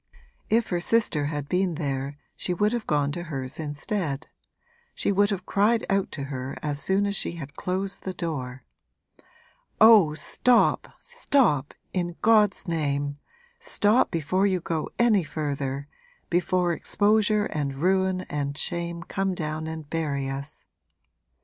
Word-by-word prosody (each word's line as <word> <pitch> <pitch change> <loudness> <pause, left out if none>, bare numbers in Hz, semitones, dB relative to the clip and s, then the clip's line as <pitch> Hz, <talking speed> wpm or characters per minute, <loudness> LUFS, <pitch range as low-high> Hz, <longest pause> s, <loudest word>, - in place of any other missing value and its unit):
If 225 +1 +2
her 175 -2 -1
sister 175 -8 +2
had 145 -1 -4
been 180 0 0
there 140 -2 -3 0.2
she 180 - -2
would 210 +5 +2
have 235 -2 -3
gone 145 -1 +1
to 175 - -4
hers 135 -6 -5
instead 155 0 -3 0.7
she - - 0
would 205 +1 +3
have 195 -3 -3
cried 220 +3 +2
out 195 -1 +1
to 140 - -4
her 135 -1 -5
as 145 -1 -2
soon 195 +6 +2
as 200 0 0
she 170 - -1
had 150 -4 -8
closed 190 +3 -2
the 190 - -4
door: 135 -7 -4 1.2
'Oh, 210 -9 +7
stop, 240 - +3
stop 275 - +1 0.2
in 175 -2 -2
God's 210 -3 +4
name, 145 -3 -1 0.4
stop 210 +4 +2
before 175 +5 +1
you 185 -2 +1
go 165 -2 -3
any 225 -6 +4
further, 140 -3 -3 0.4
before 175 0 +2
exposure 210 +3 +2
and 145 -7 -3
ruin 190 +4 +1
and 145 -4 -4
shame 170 0 -2
come 195 0 -2
down 155 -1 -3
and 160 -2 -6
bury 145 -4 -2
us!' 140 +3 -6
170 Hz, 145 wpm, -26 LUFS, 145-195 Hz, 1.2 s, Oh